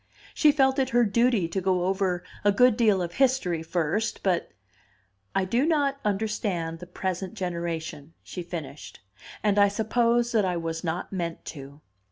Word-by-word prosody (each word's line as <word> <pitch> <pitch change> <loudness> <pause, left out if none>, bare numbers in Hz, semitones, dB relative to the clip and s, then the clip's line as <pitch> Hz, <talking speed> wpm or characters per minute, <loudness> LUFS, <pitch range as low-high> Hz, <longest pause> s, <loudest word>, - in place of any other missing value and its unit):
She 300 - +5
felt 270 -2 +2
it 260 -1 +1
her 240 -1 +3
duty 230 -3 +2
to 190 +3 -2
go 180 -1 +1
over 190 -2 0 0.2
a 205 - +5
good 250 +3 +5
deal 215 -6 +3
of 175 0 -5
history 250 -11 +1
first, 175 +6 -1
but: 180 -3 0 0.8
"I 190 -1 +2
do 235 +8 +1
not 290 -3 +1
understand 195 -5 -2
the 180 - -9
present 185 +1 -4
generation," 170 -3 -4
she 180 - -6
finished, 160 - -8 0.4
"and 205 -1 +3
I 200 - +7
suppose 235 +3 +1
that 220 -3 +3
I 180 -2 0
was 165 -1 -4
not 170 +3 -3
meant 170 -3 -4
to." 140 0 -11
190 Hz, 165 wpm, -26 LUFS, 170-230 Hz, 0.8 s, I